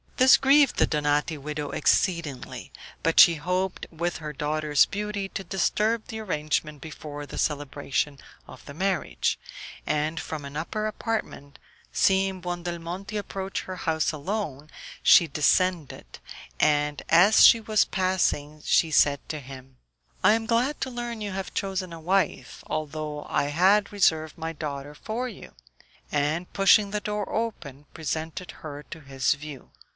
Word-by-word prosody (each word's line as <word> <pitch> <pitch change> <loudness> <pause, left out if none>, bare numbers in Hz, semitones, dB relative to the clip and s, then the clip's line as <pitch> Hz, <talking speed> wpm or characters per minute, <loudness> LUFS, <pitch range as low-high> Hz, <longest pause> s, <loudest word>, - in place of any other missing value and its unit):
This 260 +1 +7
grieved 275 0 +4
the - - +5
Donati 150 +1 0
widow 150 0 -5
exceedingly; 160 -3 0 0.3
but 165 - +2
she 170 - +9
hoped, 180 +4 -2
with 170 +1 -2
her 150 -1 -6
daughter's 150 0 +2
beauty, 205 -1 -4
to 195 - -5
disturb 210 +5 0
the 220 - -6
arrangement 155 -6 -2
before 145 -1 -8
the - - -9
celebration 145 -1 -2 0.3
of 130 - -13
the 140 - -9
marriage; 190 +5 -1 0.5
and 155 +2 -1
from 150 -3 -6
an 140 +1 -7
upper 215 +7 -3
apartment, 215 -10 -4 0.3
seeing 190 -1 +2
Buondelmonti 175 +3 -5
approach 195 -1 -4
her 185 -1 -7
house 160 -2 0
alone, 155 -2 -4 0.3
she 170 - +7
descended, 160 +2 0 0.4
and 150 -1 +2
as 180 +6 +7
he 230 - +6
was 215 -1 +2
passing 180 -6 -1
she 160 - +3
said 145 -1 +4
to 155 - -3
him, 130 -1 -12 0.5
"I 190 +3 +6
am 225 0 0
glad 245 +6 +1
to 260 - -2
learn 240 -2 -5
you 205 -1 -3
have 190 0 -5
chosen 190 -3 -3
a 165 - -8
wife, 175 -6 -1
although 155 -1 -4
I - - 0
had 190 +8 +3
reserved 160 -6 +1
my 165 0 -4
daughter 145 -2 -6
for 225 +10 -4
you;" 215 - -12 0.6
and, 150 +4 -1
pushing 200 +1 +5
the 210 0 -2
door 210 -1 -3
open, 160 - -4
presented 160 +2 -4
her 145 -2 -7
to 165 - -8
his 135 -1 0
view. 140 -2 -10
165 Hz, 145 wpm, -26 LUFS, 150-195 Hz, 0.6 s, she